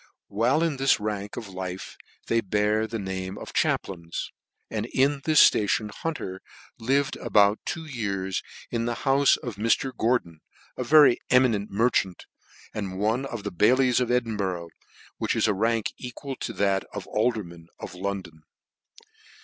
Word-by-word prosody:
While 125 +10 +2
in 160 -4 0
this 135 -2 +3
rank 105 -1 -4
of 115 -3 -5
life 95 -1 -6 0.3
they 115 0 +1
bear 105 +2 +1
the 115 - -4
name 95 -1 -4
of - - -9
chaplains, 85 -3 -1 0.4
and - - -3
in 140 +1 +1
this 155 -1 +8
ftation 105 0 0
Hunter 100 -9 -5 0.4
lived 135 +4 +1
about 105 0 +3
two 165 -2 -3
years, 100 -9 -2 0.3
in 115 -1 -1
the 120 0 -1
houfe 135 +1 +4
of 120 -5 -5
Mr. 115 +4 +1
Gor 120 +3 +3
don, 85 -8 -16 0.4
a 125 - -3
very 145 -1 +6
eminent 120 -6 +3
merchant, 100 -4 0 0.5
and 95 -3 -4
one 110 +7 0
of 115 -6 -6
the 100 - -4
bailies 125 +7 +4
of 125 -2 0
Edinburgh, 100 -8 -1 0.5
which - - 0
is - - +2
a 105 - +2
rank 110 +2 0
equal 130 +2 -6
to - - -4
that 100 -1 +1
of 105 -2 -6
alderman 105 -8 -2
of - - -7
London. 90 -4 -5
110 Hz, 155 wpm, -26 LUFS, 95-125 Hz, 0.5 s, this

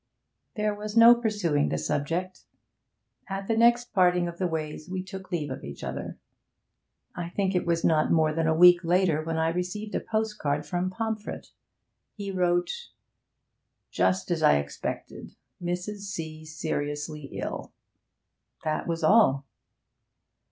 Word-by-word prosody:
There 210 -1 0
was 210 +1 -5
no 230 +1 +10
pursuing 205 -11 0
the 75 - -1
subject. 165 - -2 0.8
At 195 0 -4
the 225 - +1
next 235 +1 +3
parting 180 -3 +3
of 170 0 -7
the 185 - +1
ways 155 0 -4
we 185 0 -3
took 190 0 -9
leave 150 -5 -2
of 130 - -6
each 70 0 -8
other. - - -5 1.0
I 170 -1 -4
think 195 +1 -1
it 180 -1 0
was 165 -1 +1
not 155 -2 +3
more 155 -2 +3
than 165 0 0
a 160 - +3
week 175 +1 +8
later 175 -2 +2
when 165 0 -2
I 160 0 +2
received 180 +5 -3
a - - +1
postcard 210 -10 -2
from 180 0 -1
Pomfret. 220 +2 -4 0.6
He 200 -2 -5
wrote: 180 - 0 1.0
'Just 185 -1 +1
as 165 -2 0
I 150 - +6
expected. 70 0 -5 0.3
Mrs. 180 +4 -3
C. 160 -5 -6
seriously 150 -1 -4
ill.' - - -5 0.9
That 155 +1 -2
was 165 -1 -2
all. 155 -8 +5
175 Hz, 145 wpm, -27 LUFS, 155-200 Hz, 1.0 s, no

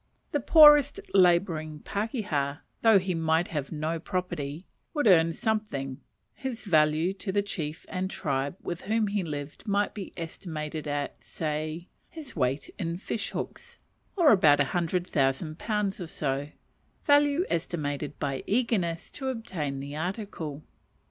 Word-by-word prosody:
The 290 - +1
poorest 295 0 +7
labouring 170 -5 +3
pakeha, 200 - -2 0.2
though 225 -3 +7
he 185 -1 0
might 160 +1 +1
have 145 -4 -3
no 160 +1 -2
property, 175 -3 -3 0.3
would 295 - +1
earn 165 -5 +6
something 160 - -2 0.3
his 260 -4 -5
value 155 -1 +3
to 195 0 -4
the 200 +1 +1
chief 160 -5 -5
and 185 0 -2
tribe 140 -4 -2
with 175 0 -4
whom 220 +2 +1
he 205 0 0
lived 150 +3 -6
might 205 0 +1
be 200 -3 -7
estimated 160 -2 -5
at, 145 -1 -3
say, 155 +2 -3 0.2
his 310 -5 -10
weight 130 +3 -1
in 170 -2 -2
fish 210 +3 -3
hooks, 480 0 -6 0.4
or 340 -6 +6
about 155 -9 +6
a - - +6
hundred 175 +1 0
thousand 150 +2 0
pounds 210 -3 -1
or 175 - -4
so: 140 -2 -2 0.6
value 290 +3 +4
estimated 150 -4 -2
by 135 -1 -2
eagerness 200 -8 0
to 270 - -5
obtain 185 - -3
the 140 +1 -6
article. 160 -4 -4
170 Hz, 140 wpm, -28 LUFS, 150-205 Hz, 0.6 s, poorest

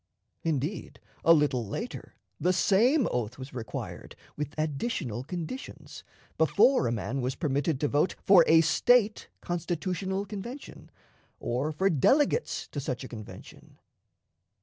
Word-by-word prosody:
Indeed, 160 +3 -3 0.2
a 165 - +6
little 145 -6 +3
later, 230 - -6 0.2
the 180 - +2
same 230 - +3
oath 120 -1 -2
was 130 +1 -9
required 115 -4 -7 0.2
with 150 +1 -5
additional 145 - -2
conditions 175 - -7 0.4
before 205 - +4
a - - 0
man 120 +4 -2
was 130 +1 -2
permitted 145 -2 -1
to 145 - +2
vote 145 +5 +1
for 190 -3 +7
a 160 0 +7
State 215 +7 +3
constitutional 180 +3 -2
convention, 215 +8 -8 0.5
or 130 +6 -1
for 185 +6 +1
delegates 280 - +2
to 145 - -5
such 130 -2 -4
a - - -6
convention. 110 -4 -11
160 Hz, 125 wpm, -28 LUFS, 135-195 Hz, 0.5 s, for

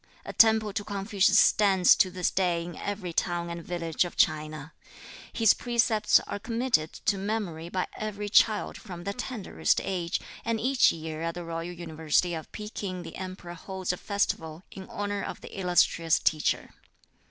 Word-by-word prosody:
A - - -6
temple 220 -2 +5
to 205 - -2
Confucius 200 0 +2
stands 195 -5 +5
to 185 - +4
this 180 -1 -1
day 175 -3 0
in 175 - -8
every 200 -4 -4
town 170 0 -1
and 170 0 -6
village 170 -2 -1
of 175 - -7
China. 155 0 0 0.6
His 225 -3 +4
precepts 235 -3 +2
are - - -6
committed 230 -8 0
to 200 -2 -1
memory 190 -6 -3
by 185 +1 -1
every 210 -1 -4
child 210 0 +3
from 175 -5 -9
the 200 - -3
tenderest 225 -2 -1
age, 180 -3 -2 0.2
and 230 -1 -1
each 260 +3 +4
year 160 -1 -6
at 165 +1 -2
the 175 -1 -6
royal 165 0 -4
university 170 0 -1
at 160 -1 -6
Pekin 200 -4 -5
the - - -9
Emperor 185 -2 -7
holds 185 +1 -4
a - - -5
festival 165 -5 -2
in 190 -1 -10
honor 205 0 -3
of - - -6
the - - -10
illustrious 175 -3 +3
teacher. 155 -1 0
185 Hz, 165 wpm, -28 LUFS, 170-205 Hz, 0.6 s, temple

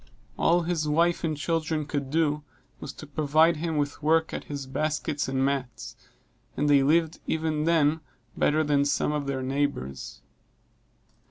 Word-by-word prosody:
All 175 +1 +3
that 170 - -4
his 160 -3 0
wife 170 +4 +2
and 155 -3 -1
children 160 0 -1
could 140 -2 -3
do, 150 -1 +1 0.4
was - - -6
to - - -10
provide 155 +2 +3
him 160 0 -2
with 145 +1 -2
work 160 +1 +2
at - - -5
his 140 -2 -5
baskets 150 +2 -2
and 135 0 0
mats; 135 -4 -3 0.6
and 150 - +1
they 145 -1 +5
lived 160 +3 +2
even 155 -1 -1
then 160 -2 +3 0.4
better 155 +1 +2
than 145 -1 +2
some 145 +1 +1
of 150 -2 -2
their 135 -1 -2
neighbors. 130 - -3
150 Hz, 160 wpm, -27 LUFS, 140-160 Hz, 0.6 s, they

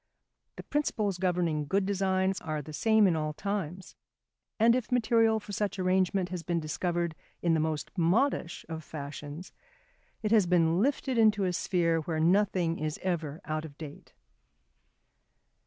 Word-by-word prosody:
The - - -8
principles 210 -10 -1
governing 170 -5 0
good 195 +4 +1
designs 190 -1 0
are 155 -2 -3
the 155 - -9
same 220 +5 +4
in 180 -4 +3
all 155 -1 -2
times; 190 -1 -4 0.6
and 230 +2 +5
if 255 -2 -3
material 225 -2 +3
for 205 - -10
such 200 -1 -2
arrangement 185 0 +1
has 180 -1 -4
been 170 0 -1
discovered 170 +2 -2 0.3
in 170 -1 +3
the 160 - +2
most 155 +1 -2
modish 180 +1 +1
of 160 -1 -6
fashions, 145 +3 -8 0.7
it 215 - 0
has 215 -5 +5
been 170 0 +3
lifted 265 -1 0
into 215 -2 +4
a 180 -1 0
sphere 175 -3 +1
where 160 0 -3
nothing 175 -1 +2
is 155 0 -2
ever 165 -3 -2
out 155 0 -2
of 150 -2 -10
date. 150 -3 -10
180 Hz, 155 wpm, -29 LUFS, 160-200 Hz, 0.7 s, and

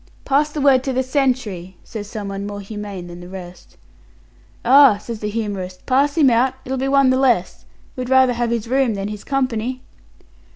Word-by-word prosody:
"Pass 290 +2 +2
the 300 - -4
word 270 -2 +4
to 265 - -1
the 260 +1 +1
sentry," 250 - -1
says 205 -2 -8
someone 200 -2 -5
more 205 0 -6
humane 200 -2 -7
than 175 0 -10
the 175 0 -11
rest. 180 -1 -11 0.9
"Ah," 265 -3 +7
says 225 +1 -7
the 210 - -3
humorist, 200 -4 -5
"pass 280 +4 +2
him 280 -5 +5
out; 250 +3 +2
it'll 265 - -2
be 265 - -1
one 275 -1 +4
the 260 - +2
less. 240 -9 +1 0.3
We'd 255 -1 -5
rather 260 -1 +5
have 240 0 -1
his 235 -1 -2
room 260 -3 +1
than 200 +1 -4
his 210 -1 -7
company." 255 -2 -2
235 Hz, 190 wpm, -20 LUFS, 205-265 Hz, 0.9 s, Ah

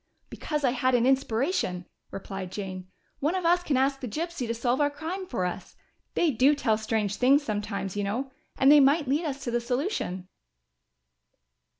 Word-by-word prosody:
"Because 300 -1 -3
I 255 - +3
had 255 0 +1
an 240 0 +3
inspiration," 260 - 0 0.2
replied 195 -1 -6
Jane. 185 -2 -6 0.3
"One 305 +6 0
of 370 -2 -2
us 350 +1 +4
can 295 -6 0
ask 270 +1 +1
the 255 - -5
gypsy 315 +2 -4
to 230 - -1
solve 245 +3 0
our 290 - +3
crime 325 +6 -5
for 205 - -2
us! 180 - -6 0.4
They 335 -3 +3
do 270 +4 +4
tell 235 -6 +1
strange 215 -2 -1
things, 275 +3 +4
sometimes, 205 -4 -3
you 205 - -1
know 245 +7 -3 0.3
and 270 +1 +6
they 295 - +8
might 285 +2 +4
lead 295 +6 +1
us 275 -3 -4
to 240 - -3
the 240 0 0
solution!" 245 - -2
260 Hz, 185 wpm, -27 LUFS, 215-290 Hz, 0.4 s, they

